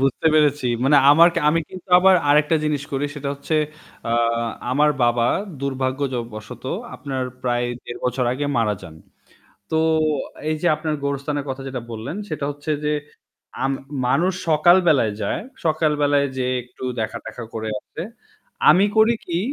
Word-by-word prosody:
বুঝতে 135 Hz, +3 st, +1 dB
পেরেছি। 150 Hz, -3 st, +3 dB, 0.2 s
মানে 145 Hz, +2 st, +5 dB
আমার 165 Hz, +4 st, +7 dB, 0.2 s
আমি 165 Hz, +2 st, +3 dB
কিন্তু 185 Hz, 0 st, -11 dB
আবার 190 Hz, +1 st, +6 dB
আরেকটা 150 Hz, +2 st, +4 dB
জিনিস 150 Hz, -2 st, 0 dB
করি 135 Hz, +1 st, -1 dB
সেটা 145 Hz, -1 st, -4 dB
হচ্ছে 140 Hz, +3 st, -4 dB, 0.6 s
আ -, -, +1 dB, 0.6 s
আমার 150 Hz, +3 st, +3 dB
বাবা 120 Hz, 0 st, +3 dB, 0.3 s
দুর্ভাগ্য 135 Hz, -1 st, -2 dB
য -, -, -3 dB, 0.2 s
বশত 110 Hz, 0 st, -9 dB, 0.3 s
আপনার 135 Hz, -2 st, -4 dB, 0.2 s
প্রায় 120 Hz, -1 st, 0 dB, 0.2 s
১.৫ 120 Hz, -, -7 dB
বছর 125 Hz, 0 st, 0 dB
আগে 145 Hz, +3 st, -2 dB
মারা 110 Hz, -2 st, +1 dB
যান। 80 Hz, -1 st, -10 dB, 0.8 s
তো 160 Hz, -, +1 dB, 0.7 s
এই 155 Hz, -, 0 dB
যে -, -, +1 dB
আপনার 155 Hz, 0 st, -2 dB
গোরস্থানের 140 Hz, +1 st, -2 dB
কথা 135 Hz, 0 st, -4 dB
যেটা 130 Hz, -2 st, -4 dB
বললেন 115 Hz, -, -5 dB
সেটা 155 Hz, -3 st, -3 dB
হচ্ছে 145 Hz, +2 st, -6 dB
যে, 150 Hz, -, +1 dB, 0.7 s
আম 135 Hz, +1 st, +1 dB, 0.3 s
মানুষ 175 Hz, +9 st, +2 dB, 0.2 s
সকাল 160 Hz, +3 st, +6 dB
বেলায় 125 Hz, -9 st, +3 dB
যায় 100 Hz, -, -1 dB, 0.2 s
সকালবেলায় 150 Hz, -3 st, +2 dB
যেয়ে 130 Hz, 0 st, 0 dB
একটু 125 Hz, +1 st, -11 dB, 0.2 s
দেখা-টেখা 115 Hz, +2 st, -5 dB
করে 110 Hz, -1 st, -3 dB
আসে। 165 Hz, -, -8 dB, 0.7 s
আমি 190 Hz, +3 st, +5 dB
করি 220 Hz, +2 st, +5 dB
কি 170 Hz, -1 st, -2 dB
140 Hz, 155 wpm, -22 LUFS, 125-155 Hz, 0.8 s, আমার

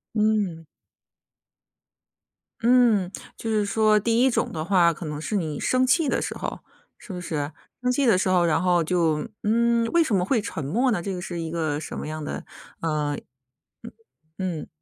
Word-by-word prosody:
嗯。 210 Hz, -6 st, +1 dB, 2.0 s
嗯。 230 Hz, -6 st, +4 dB, 0.3 s
就 225 Hz, -, -4 dB
是 215 Hz, -2 st, +1 dB
说 215 Hz, +1 st, +3 dB
第 230 Hz, +3 st, +2 dB
一 265 Hz, -, +5 dB
种 240 Hz, -, 0 dB
的 155 Hz, -2 st, -3 dB
话， 175 Hz, -1 st, +4 dB
可 165 Hz, -, -8 dB
能 150 Hz, -1 st, -4 dB
是 190 Hz, +7 st, -3 dB
你 160 Hz, -6 st, -2 dB
生 255 Hz, 0 st, +2 dB
气 300 Hz, +5 st, +3 dB
的 -, -, +1 dB
时 -, -, -4 dB
候， -, -, -4 dB, 0.4 s
是 -, -, -11 dB
不 180 Hz, -, -5 dB
是？ 150 Hz, -4 st, -3 dB, 0.3 s
生 250 Hz, -, +1 dB
气 275 Hz, +2 st, +1 dB
的 230 Hz, -6 st, +5 dB
时 185 Hz, -, +1 dB
候， 180 Hz, -2 st, +4 dB
然 165 Hz, 0 st, +2 dB
后 175 Hz, -2 st, +3 dB
就 160 Hz, -3 st, +1 dB
嗯， 235 Hz, +2 st, +2 dB
为 340 Hz, -1 st, +4 dB
什 230 Hz, -9 st, 0 dB
么 180 Hz, -, +2 dB
会 230 Hz, +5 st, +1 dB
沉 205 Hz, -7 st, -5 dB
默 235 Hz, -, +1 dB
呢？ 200 Hz, -6 st, 0 dB
这 195 Hz, +2 st, -3 dB
个 -, -, -5 dB
是 175 Hz, -1 st, -5 dB
一 165 Hz, -, -4 dB
个 160 Hz, -3 st, -1 dB
什 -, -, -7 dB
么 -, -, -5 dB
样 155 Hz, 0 st, -5 dB
的， -, -, -5 dB, 0.4 s
呃 150 Hz, -2 st, -1 dB, 1.2 s
嗯。 180 Hz, -4 st, -2 dB
嗯。 -, -, -12 dB
185 Hz, 205 characters per minute, -25 LUFS, 165-225 Hz, 2.0 s, 一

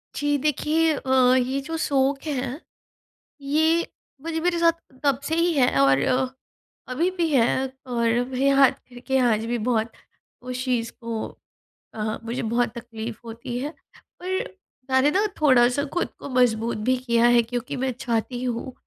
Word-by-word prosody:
जी, 290 Hz, 0 st, +1 dB
देखिए 305 Hz, +3 st, +1 dB
अ, 260 Hz, -2 st, +3 dB
ये 260 Hz, +2 st, +1 dB
जो 325 Hz, +4 st, -5 dB
शोक 275 Hz, -2 st, +1 dB
है। 270 Hz, 0 st, -3 dB, 0.8 s
ये 315 Hz, +4 st, +2 dB, 0.4 s
मुझे 325 Hz, 0 st, -2 dB
मेरे 345 Hz, +1 st, 0 dB
साथ 335 Hz, 0 st, +5 dB, 0.3 s
तब 275 Hz, -2 st, +2 dB
से 320 Hz, +3 st, -1 dB
ही 335 Hz, 0 st, +2 dB
है 260 Hz, -4 st, +4 dB
और 135 Hz, 0 st, +5 dB, 0.9 s
अभी 335 Hz, +8 st, +1 dB
भी 335 Hz, -2 st, +2 dB
है 245 Hz, -5 st, +4 dB, 0.4 s
और 235 Hz, -2 st, 0 dB, 0.2 s
मेरे 265 Hz, +1 st, +1 dB
हाथ 275 Hz, -1 st, +7 dB, 0.2 s
कर 245 Hz, -1 st, -12 dB
के 265 Hz, 0 st, +2 dB
आज 230 Hz, -4 st, +2 dB
भी 240 Hz, +1 st, -1 dB
बहुत 225 Hz, -2 st, +1 dB, 0.5 s
उस 255 Hz, 0 st, -4 dB
चीज़ 240 Hz, -3 st, -1 dB
को 230 Hz, -1 st, -4 dB, 0.7 s
अ, 215 Hz, 0 st, -3 dB
मुझे 235 Hz, +2 st, -3 dB
बहुत 235 Hz, +2 st, +1 dB
तकलीफ़ 230 Hz, -1 st, -7 dB
होती 235 Hz, +1 st, -6 dB
है 285 Hz, -, -3 dB, 0.5 s
पर 375 Hz, +1 st, -2 dB, 0.5 s
मैंने 260 Hz, +3 st, +4 dB
ना 395 Hz, +6 st, +2 dB, 0.2 s
थोड़ा-सा 255 Hz, -1 st, +4 dB
ख़ुद 350 Hz, -, 0 dB
को -, -, -7 dB
मज़बूत 235 Hz, -3 st, +1 dB
भी 255 Hz, -, +3 dB
किया 235 Hz, -2 st, +2 dB
है, 240 Hz, 0 st, +6 dB
क्योंकि 240 Hz, +1 st, -4 dB
मैं 265 Hz, -, +1 dB
चाहती 240 Hz, +1 st, -2 dB
हूँ, 245 Hz, +1 st, -3 dB
255 Hz, 160 wpm, -24 LUFS, 235-290 Hz, 0.9 s, हाथ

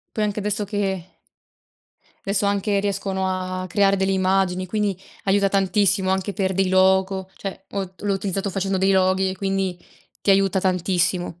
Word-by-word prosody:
Poi 215 Hz, -, +1 dB
anche 210 Hz, 0 st, -2 dB
adesso 210 Hz, +1 st, -1 dB
che 195 Hz, -3 st, -3 dB, 1.1 s
adesso 200 Hz, +1 st, 0 dB
anche 200 Hz, 0 st, +1 dB
riescono 195 Hz, -1 st, -1 dB
a 185 Hz, 0 st, -2 dB
a -, -, -5 dB
creare 195 Hz, +2 st, +3 dB
delle 190 Hz, 0 st, +1 dB
immagini, 185 Hz, -1 st, +1 dB
quindi 205 Hz, -1 st, -1 dB, 0.3 s
aiuta 195 Hz, 0 st, +3 dB
tantissimo 195 Hz, -1 st, +2 dB
anche 190 Hz, +2 st, -1 dB
per 190 Hz, -2 st, -1 dB
dei 190 Hz, 0 st, +1 dB
logo. 190 Hz, 0 st, +2 dB
Cioè, 195 Hz, -1 st, -6 dB
ho 190 Hz, -2 st, -4 dB
l'ho 205 Hz, -1 st, -2 dB
utilizzato 195 Hz, 0 st, -2 dB
facendo 195 Hz, 0 st, -1 dB
dei 190 Hz, +1 st, +3 dB
loghi 190 Hz, 0 st, +2 dB
e 190 Hz, -, -6 dB
quindi 195 Hz, -2 st, -1 dB, 0.4 s
ti -, -, +1 dB
aiuta 195 Hz, -1 st, +3 dB
tantissimo. 180 Hz, -1 st, 0 dB
190 Hz, 165 wpm, -22 LUFS, 185-200 Hz, 1.1 s, creare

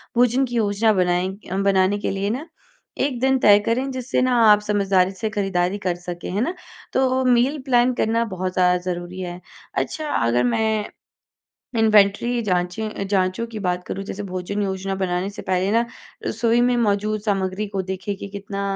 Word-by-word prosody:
भोजन 250 Hz, +2 st, +3 dB
की 240 Hz, -1 st, -6 dB
योजना 215 Hz, 0 st, +2 dB
बनाएँ 180 Hz, 0 st, +1 dB, 0.2 s
अ, 190 Hz, -, -1 dB
बनाने 195 Hz, 0 st, +2 dB
के -, -, -2 dB
लिए 195 Hz, +1 st, -1 dB
ना 320 Hz, -, -10 dB, 0.5 s
1 270 Hz, -4 st, 0 dB
दिन 265 Hz, +1 st, +3 dB
तय 205 Hz, -2 st, +6 dB
करें 255 Hz, +4 st, 0 dB
जिससे 255 Hz, 0 st, -1 dB
ना 255 Hz, -1 st, +2 dB, 0.2 s
आप 210 Hz, -, +6 dB
समझदारी 195 Hz, -3 st, +2 dB
से 215 Hz, +3 st, -3 dB
ख़रीददारी 195 Hz, -2 st, 0 dB
कर 175 Hz, -1 st, +1 dB
सकें, 175 Hz, 0 st, -7 dB
हैं 200 Hz, +4 st, -1 dB
ना? 340 Hz, +8 st, 0 dB, 0.4 s
तो 260 Hz, 0 st, +2 dB
मील 255 Hz, +4 st, +3 dB
प्लान 250 Hz, -1 st, +3 dB
करना 230 Hz, +1 st, +2 dB
बहुत 185 Hz, 0 st, -3 dB
ज़्यादा 180 Hz, 0 st, +3 dB
ज़रूरी 175 Hz, +1 st, -6 dB
है। 175 Hz, -1 st, -5 dB, 0.3 s
अच्छा, 310 Hz, -1 st, -2 dB
अगर 120 Hz, -, +1 dB
मैं 215 Hz, -, 0 dB, 0.9 s
इन्वेंट्री 215 Hz, +2 st, +4 dB
जाँचें 185 Hz, +2 st, -1 dB
अ, 200 Hz, -, -5 dB
जाँचों 190 Hz, +2 st, 0 dB
की 220 Hz, -2 st, -7 dB
बात 180 Hz, -2 st, -1 dB
करूँ 195 Hz, -, -4 dB
जैसे 205 Hz, +1 st, -5 dB
भोजन 185 Hz, +2 st, -4 dB
योजना 190 Hz, 0 st, -2 dB
बनाने 185 Hz, 0 st, -1 dB
से 205 Hz, -, -9 dB
पहले 185 Hz, +2 st, 0 dB
ना 230 Hz, +1 st, +3 dB, 0.4 s
रसोई 230 Hz, +2 st, +1 dB
में 245 Hz, 0 st, +3 dB
मौजूद 215 Hz, -1 st, +1 dB
सामग्री 195 Hz, -1 st, -1 dB
को 195 Hz, -1 st, -2 dB
देखिए 190 Hz, +2 st, -4 dB
कि 200 Hz, -, -8 dB
कितना 200 Hz, 0 st, -6 dB
200 Hz, 180 wpm, -22 LUFS, 185-230 Hz, 0.9 s, तय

